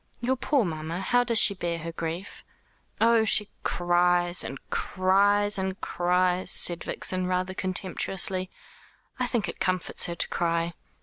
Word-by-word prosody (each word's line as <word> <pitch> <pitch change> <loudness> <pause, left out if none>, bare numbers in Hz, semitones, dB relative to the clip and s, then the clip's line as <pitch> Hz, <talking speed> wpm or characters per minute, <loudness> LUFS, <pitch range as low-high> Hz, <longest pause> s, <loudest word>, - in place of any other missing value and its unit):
"Your 250 +2 0
poor 265 -1 0
mamma! 160 +1 -5
How 245 +6 +2
does 235 -2 0
she 210 - +6
bear 175 -3 -3
her 165 +1 -6
grief?" 165 +4 -6 0.6
"Oh, 230 0 +4
she 210 -1 +4
cries, 175 0 +2
and 135 - -6
cries, 200 +2 +2
and 190 0 -3
cries," 180 +1 0
said 175 -1 +3
Vixen, 185 -1 -1
rather 185 +1 -2
contemptuously. 185 0 -1 0.7
"I 250 - 0
think 230 -7 -1
it 170 - -7
comforts 185 -1 0
her 170 - -4
to - - 0
cry. 170 0 -1
185 Hz, 145 wpm, -26 LUFS, 175-205 Hz, 0.7 s, she